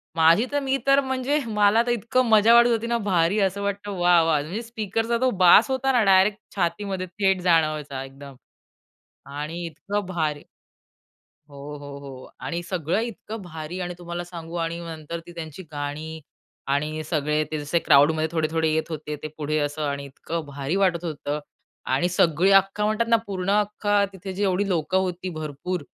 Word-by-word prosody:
माझी 165 +8 +5
तर 290 - +1
मी 270 0 0
तर 275 0 +6
म्हणजे 265 +2 0
मला 210 +1 +3
तर - - +2
इतकं 240 +2 +1
मजा 220 +1 +6
वाटत 235 0 +7
होती 230 0 0
ना, 235 - +1
भारी 195 -2 +1
असं 195 +1 0
वाटतं 200 0 -3
वा! 175 -1 +5
वा! 160 -3 +2
म्हणजे 180 +10 -5
स्पीकरचा 225 0 -2
तो 260 - +4 0.2
बास 210 +8 +7
होता 265 +1 +1
ना, 245 -4 +3
डायरेक्ट 195 +2 +4 0.2
छातीमध्ये 185 +1 -2
थेट 190 0 0
जाणवायचा 155 -6 +1
एकदम. 135 0 -11 1.0
आणि 155 +4 -5
इतकं 200 +6 -4
भारी 155 -5 -2 1.1
हो, 140 - -13 0.2
हो, 145 -1 -9
हो. 135 -2 -10
आणि 170 +1 -3
सगळं 175 +1 -1
इतकं 225 -1 -6
भारी 165 0 -7
आणि 180 -1 -3
तुम्हाला 175 0 -5
सांगू 170 -1 -9
आणि 165 0 -2
नंतर 165 0 -6
ती 175 - -11
त्यांची 165 +1 -8
गाणी 150 +2 -5 0.5
आणि 150 +3 -1
सगळे 150 -1 0
ते 155 - -1
जसे 145 +4 0
क्राउडमध्ये 155 +2 +4
थोडे-थोडे 160 0 0
येत 160 0 +1
होते, 150 -1 -5
ते 155 - -7
पुढे 155 0 -1
असं 145 +1 -2
आणि 140 0 -3
इतकं 155 +4 -5
भारी 140 +3 -3
वाटत 185 -3 +1
होतं. 150 -1 -3 0.5
आणि 175 +1 +1
सगळी 175 +1 +3
अख्खा 195 +2 +4
म्हणतात 215 +2 +1
ना, 230 - +5
पूर्ण 190 -1 -3
अख्खा 205 0 +1
तिथे 190 0 -7
जेवढी 195 0 0
लोकं 175 +1 0
होती 185 -1 -2
भरपूर, 155 +2 -4
175 Hz, 170 wpm, -24 LUFS, 155-205 Hz, 1.1 s, वाटत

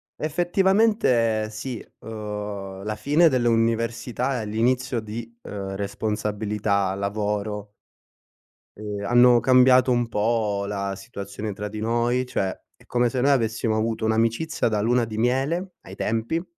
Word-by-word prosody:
effettivamente 175 - +2
sì, 115 +2 -6
uhm, 105 -3 -6
la 110 0 -2
fine 150 +10 +4
dell'università 115 0 0
e - - -5
l'inizio 120 +2 0
di, 115 +2 -7
uhm, 95 -1 -5
responsabilità, 105 -1 -1
lavoro 105 +1 -2 1.1
ehm, 105 -1 -5
hanno 120 +1 +6
cambiato 130 0 +5
un 120 -1 +1
po' 105 -2 0
la 100 -1 -3
situazione 100 0 -6
tra 105 +2 -5
di 105 +1 -7
noi, 120 +3 +1
cioè, 95 -6 -2 0.2
è - - -23
come 120 -1 +1
se 125 -1 -2
noi 140 +2 +4
avessimo 115 -3 +1
avuto 110 0 -1
un'amicizia 115 +9 +1
da 105 -2 0
luna 120 +2 +2
di 110 -1 -7
miele 140 +10 0
ai 95 - -11
tempi 115 - -1
115 Hz, 130 wpm, -24 LUFS, 105-125 Hz, 1.1 s, hanno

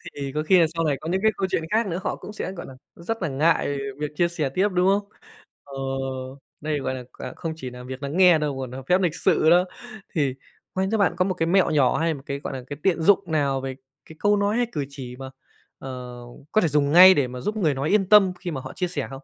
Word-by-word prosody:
Thì 140 -1 -4
có 155 - 0
khi 180 +3 +5
là 165 - +5
sau 165 0 -1
này 145 -3 +1
có 160 - -5
những 190 +2 0
cái 220 - +5
câu 190 - 0
chuyện 160 - 0
khác 220 0 +2
nữa, 175 +1 -3
họ - - -1
cũng 210 - -10
sẽ, 190 - -4
gọi 175 - -8
là, 135 - -11 0.2
rất 225 +5 -5
là 170 - 0
ngại 145 0 +1 0.2
việc 150 0 -3
chia 170 +1 +2
sẻ 160 -5 -2
tiếp, 190 +9 +1
đúng 180 +1 +2
không? 200 +1 +1 0.5
Ờ, 140 - -14 0.9
đây, 150 -1 -1
gọi 130 -1 -3
là, 125 - -7
quà 130 - -7
không 165 -1 -4
chỉ 130 -5 -7
là 125 0 -10
việc 130 +2 -8
nắng 140 +5 -4
nghe 180 -3 +7
đâu 145 -3 -2
còn 130 -2 -5
nà 130 +1 -7
phép 180 +1 +3
lịch 170 -2 0
sự 155 - +2
đó. 175 +2 +5 0.5
Thì 140 -6 0 0.4
quen 190 0 -1
cho 220 - +2
bạn 200 -5 +2
có 180 - +2
một 190 - 0
cái 165 - -1
mẹo 185 -1 +3
nhỏ 135 -5 +3
hay 165 0 +1
một 135 -2 -10
cái, 140 0 -4
gọi 140 - -6
là, 130 -1 -6
cái 145 - -6
tiện 175 -4 +2
dụng 200 +4 +5
nào 140 -3 +1
về 135 -1 -5 0.3
cái 160 - -13
câu 205 0 +3
nói, 205 +3 +1
hay 245 -1 +1
cử 145 -3 -3
chỉ 125 -3 -8
mà, 135 -1 -7 0.5
ờ, 125 -2 -8 0.3
có 215 - +3
thể 170 - +2
dùng 145 -1 +1
ngay 185 +3 +10
để 140 -6 +1
mà 125 0 -7
giúp 210 +1 -2
người 160 -8 +2
nói 135 +3 -2
yên 195 -2 +2
tâm 200 -3 +6
khi 175 -3 -5
mà 135 -4 -4
họ - - -9
chia 180 - -2
sẻ 155 -5 -3
không? - - -6
160 Hz, 280 wpm, -24 LUFS, 140-185 Hz, 0.9 s, ngay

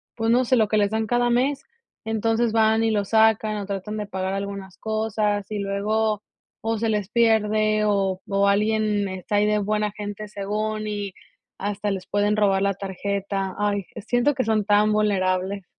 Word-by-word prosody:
pues 225 0 0
no 250 +1 +3
sé, 255 - +3
lo 220 -3 +3
que 215 - +1
les 205 -1 +3
dan 220 +1 -1
cada 240 +2 +1
mes, 260 +4 +1 0.4
entonces, 225 +1 0
van 220 0 +3
y 225 - +2
lo 205 -2 +1
sacan 220 0 +3
o 205 - -4
tratan 200 +2 -4
de 210 - -4
pagar 190 0 -3
algunas 195 -1 -5
cosas 215 -2 -1
y 210 - -2
luego 210 +2 0 0.4
o 225 0 -1
se 225 +1 -1
les 210 -3 0
pierde, 215 -2 +2
o 195 -2 +1
o 200 0 +2
alguien 210 0 +1
está 190 +2 -4
ahí 205 +1 +4
de 210 0 +2
buena 210 +1 0
gente 210 0 -6
según 215 +1 -3
y 205 -2 -4 0.4
hasta 205 +1 -3
les 190 -1 -4
pueden 205 +1 +1
robar 195 -2 +2
la 200 0 +2
tarjeta. 195 0 -3
Ay, 205 -2 0
eh, - - -6
siento 245 +7 +1
que 260 - -1
son 215 -2 +1
tan 210 +1 +4
vulnerables. 195 -2 0
210 Hz, 185 wpm, -24 LUFS, 200-220 Hz, 0.4 s, ahí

